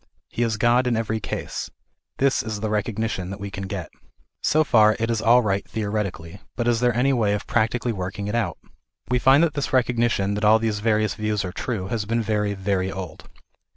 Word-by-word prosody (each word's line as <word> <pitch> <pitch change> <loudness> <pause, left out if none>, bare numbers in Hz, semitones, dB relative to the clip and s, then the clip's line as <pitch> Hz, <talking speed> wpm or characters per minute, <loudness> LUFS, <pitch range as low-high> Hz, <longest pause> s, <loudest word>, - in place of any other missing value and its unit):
He - - -4
is 115 -2 +1
God 120 +3 +3
in 120 -2 +1
every 110 0 -1
case. - - -5 0.5
This 135 0 +2
is 110 -1 -4
the 110 0 -2
recognition 105 -3 -2
that 95 +1 -6
we 100 0 -6
can 95 0 -5
get. - - -5 0.5
So 155 +1 +3
far 110 -6 +5
it 115 +1 0
is 115 -2 0
all 120 +2 +5
right 100 -2 0
theoretically, 100 -5 -4
but 120 0 -1
is 120 -1 +2
there 120 -1 +2
any 135 +2 +3
way 110 -5 +2
of 105 - -5
practically 120 +1 0
working 100 0 -4
it 105 - -3
out? 110 -8 -1 0.5
We 125 - +3
find 135 +5 +5
that 165 -4 +1
this 145 -1 -2
recogni 120 -2 +2
tion 100 -2 0
that 105 0 -3
all 105 +1 +6
these 110 -2 -1
various 110 -1 +1
views 105 -2 -2
are 90 - -4
true, 95 -2 -4
has 110 -2 -2
been 115 +2 0
very, 105 -1 0
very 95 -1 -1
old. 95 -3 -8
110 Hz, 215 wpm, -23 LUFS, 100-120 Hz, 0.5 s, all